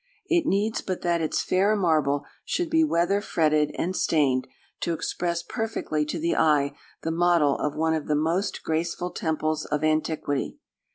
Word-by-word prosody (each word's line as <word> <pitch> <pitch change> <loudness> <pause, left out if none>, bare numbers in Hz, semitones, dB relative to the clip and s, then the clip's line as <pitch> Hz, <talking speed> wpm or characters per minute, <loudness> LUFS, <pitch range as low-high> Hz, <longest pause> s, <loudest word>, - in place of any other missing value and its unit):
It 345 -4 +1
needs 210 +3 +1
but 185 -2 -4
that 170 -1 +1
its 155 - 0
fair 200 +3 +2
marble 155 -7 +1 0.2
should 350 -3 -2
be 320 0 +4
weather 195 - +2
fretted 155 -6 +2
and 185 +2 -1
stained, 135 -7 +2 0.3
to 170 - -1
express 170 +1 -2
perfectly 220 -10 -2
to 160 - -3
the 165 +1 0
eye 145 -3 +3 0.3
the 165 - -1
model 170 -4 +3
of 150 -1 -1
one 160 +1 +1
of 155 -2 -2
the 150 - +2
most 165 +6 0
graceful 170 +2 -2
temples 155 -1 -1
of 150 0 -2
antiquity. 155 -2 0
165 Hz, 165 wpm, -26 LUFS, 150-185 Hz, 0.3 s, be